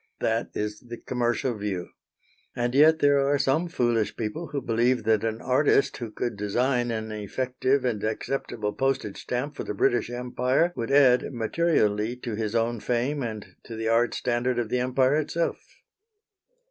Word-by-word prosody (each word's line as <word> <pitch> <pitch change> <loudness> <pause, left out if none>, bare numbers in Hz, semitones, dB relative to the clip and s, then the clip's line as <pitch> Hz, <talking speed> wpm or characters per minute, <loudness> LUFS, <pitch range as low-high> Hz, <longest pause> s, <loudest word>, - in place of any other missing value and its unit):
That 115 +1 0
is 105 0 -3
the 120 -2 -9
commercial 120 +1 -1
view. 100 -4 -4 0.7
And 120 0 -1
yet 155 +3 +6
there 145 -2 +4
are 140 +1 +2
some 140 +5 +1
foolish 120 -8 0
people 115 +10 -4
who 140 0 -3
believe 120 +1 +1
that 110 -2 +2
an 115 0 -2
artist 140 +2 +2
who 120 -3 -5
could 115 +1 -3
design 120 +4 0
an 110 -1 -3
effective 130 +5 -1
and 110 -4 -1
acceptable 110 -1 -2
postage 135 -6 -1
stamp 140 +4 -3
for - - -4
the 105 - -5
British 120 +1 +1
Empire 125 +7 0
would 115 - -3
add 135 -3 +4
materially 115 -4 +1
to 125 -2 -6
his 110 +1 -3
own 115 0 0
fame 125 +6 -1
and 110 -4 -6
to 115 - -7
the 110 0 -2
art 115 +1 +2
standard 125 0 0
of 120 -2 -1
the 125 - 0
Empire 130 +3 +2
itself. 165 +2 -1
120 Hz, 165 wpm, -26 LUFS, 110-135 Hz, 0.7 s, yet